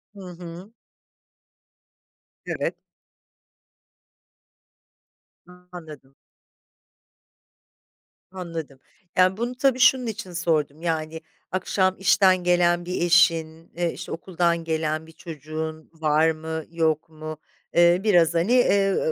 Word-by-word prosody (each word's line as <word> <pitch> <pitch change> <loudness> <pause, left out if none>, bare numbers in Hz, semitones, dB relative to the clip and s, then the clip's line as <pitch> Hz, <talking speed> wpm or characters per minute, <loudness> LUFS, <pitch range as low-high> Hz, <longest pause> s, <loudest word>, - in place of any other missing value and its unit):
Hı - - -12
hı. 175 +3 -10 1.7
Evet. - - -3 2.7
Anladım. 175 -7 -13 2.2
Anladım. 165 -7 -7 0.4
Yani, 185 +2 +4
bunu 240 +2 -3
tabii, 260 -1 +1
şunun 250 0 +5
için 215 -4 -6
sordum, 160 -3 -1
yani, 160 -1 -3 0.3
akşam 185 +1 0
işten 185 -1 +4
gelen 175 0 +2
bir 180 +1 -3
eşin, 165 -1 +2
eee, 170 -1 -1
işte, - - -8
okuldan 170 -1 -1
gelen 160 -1 -2
bir 160 - -14
çocuğun 155 0 -7
var 160 0 +2
mı 160 0 -5
yok 160 -1 0
mu? 155 0 -8 0.4
Eee, 175 +1 +4
biraz, 175 -6 +4
hani, 170 +7 +1
eee, 200 -6 +3
170 Hz, 95 wpm, -24 LUFS, 160-185 Hz, 2.7 s, şunun